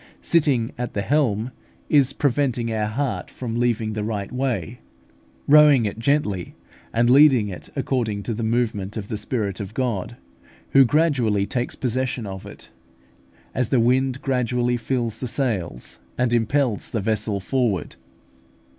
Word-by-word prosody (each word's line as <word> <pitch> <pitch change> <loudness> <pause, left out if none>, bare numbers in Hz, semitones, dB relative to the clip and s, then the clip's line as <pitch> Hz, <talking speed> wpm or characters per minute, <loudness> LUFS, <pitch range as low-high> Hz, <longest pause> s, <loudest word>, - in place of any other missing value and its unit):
Sitting 140 -8 +2
at 125 -1 -4
the 100 - -1
helm 125 -5 +1 0.4
is 140 -3 +4
preventing 125 -4 0
our 105 -1 0
heart 130 +4 -2
from 120 -2 -4
leaving 115 -3 0
the 105 -1 -3
right 105 -2 -3
way, 125 -2 -2 0.7
rowing 145 -4 +7
it 105 +2 -3
gently, 115 -8 0 0.4
and 115 +1 +2
leading 130 -5 +6
it 90 - -8
according 125 -7 -1
to 115 - -3
the 115 - -4
movement 110 -3 -1
of 105 -1 -6
the - - -2
Spirit 105 -3 -2
of 100 +2 -7
God, 120 -3 -2 0.5
who 135 -1 +7
gradually 125 -9 +2
takes 120 +3 -3
possession 130 -1 -2
of 95 -1 -7
it, - - -12 0.8
as 125 -3 -1
the 130 - +3
wind 130 +2 +1
gradually 125 -2 0
fills 120 -2 -2
the 130 - -3
sails, 90 - -3 0.2
and 125 -1 +1
impels 120 0 +1
the 110 - -2
vessel 105 0 -1
forward. 110 - -1
120 Hz, 145 wpm, -23 LUFS, 105-130 Hz, 0.8 s, rowing